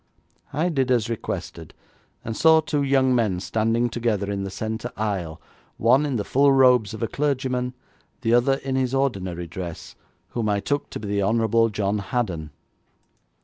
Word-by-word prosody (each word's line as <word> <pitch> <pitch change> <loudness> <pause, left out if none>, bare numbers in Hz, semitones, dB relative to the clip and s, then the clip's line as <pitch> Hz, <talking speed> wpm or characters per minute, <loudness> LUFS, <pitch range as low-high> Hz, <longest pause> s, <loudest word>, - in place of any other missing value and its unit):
I 160 +5 0
did 135 -6 0
as 120 -2 +1
requested, 115 - -5 0.5
and 110 - -3
saw 160 +4 +6
two 150 -2 -1
young 135 -2 +3
men 110 -7 +1
standing 115 +5 0
together 110 -4 -1
in 100 -1 -2
the 95 - -4
centre 110 +4 -4
aisle, 95 -7 -3 0.4
one 130 +6 +4
in 140 - -2
the 105 - -1
full 140 +6 +3
robes 125 -6 +4
of 110 - -5
a - - +1
clergyman, 130 -3 -1 0.5
the 115 - +1
other 120 +3 +4
in 135 -1 -4
his 130 0 0
ordinary 95 -10 -1
dress, 85 -1 -7 0.3
whom 115 -3 -2
I 100 -1 +1
took 145 +7 -2
to - - -6
be 105 - -6
the 100 0 0
Honourable 115 +2 +2
John 105 0 -1
Haddon. 95 -7 -3
115 Hz, 170 wpm, -24 LUFS, 100-130 Hz, 0.5 s, saw